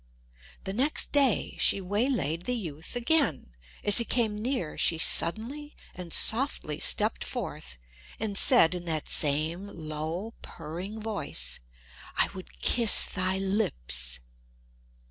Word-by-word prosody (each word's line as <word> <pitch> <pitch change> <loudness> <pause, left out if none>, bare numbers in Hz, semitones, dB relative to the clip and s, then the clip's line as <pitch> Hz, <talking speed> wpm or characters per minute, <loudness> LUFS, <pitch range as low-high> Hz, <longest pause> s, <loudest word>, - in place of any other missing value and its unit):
The 195 - -5
next 270 +8 +1
day 275 -6 +2
she - - +3
waylaid 195 - -1
the 250 - -2
youth 165 -4 -7
again; 245 - +1 0.3
as 205 +3 +6
he - - +1
came 230 -3 0
near 230 - -2
she 165 - +1
suddenly 245 - +1 0.2
and 180 -2 -9
softly 220 - +1
stepped - - +1
forth 65 0 -6 0.4
and 210 -2 -3
said 200 - +5
in 175 -1 -6
that 160 -3 -3
same 155 +6 +1
low, 165 +4 -6
purring 175 +7 -8
voice, 155 - -4 0.6
"I - - +3
would - - -12
kiss 230 -3 +6
thy 185 0 0
lips!" 65 - -2
190 Hz, 125 wpm, -27 LUFS, 155-230 Hz, 0.6 s, as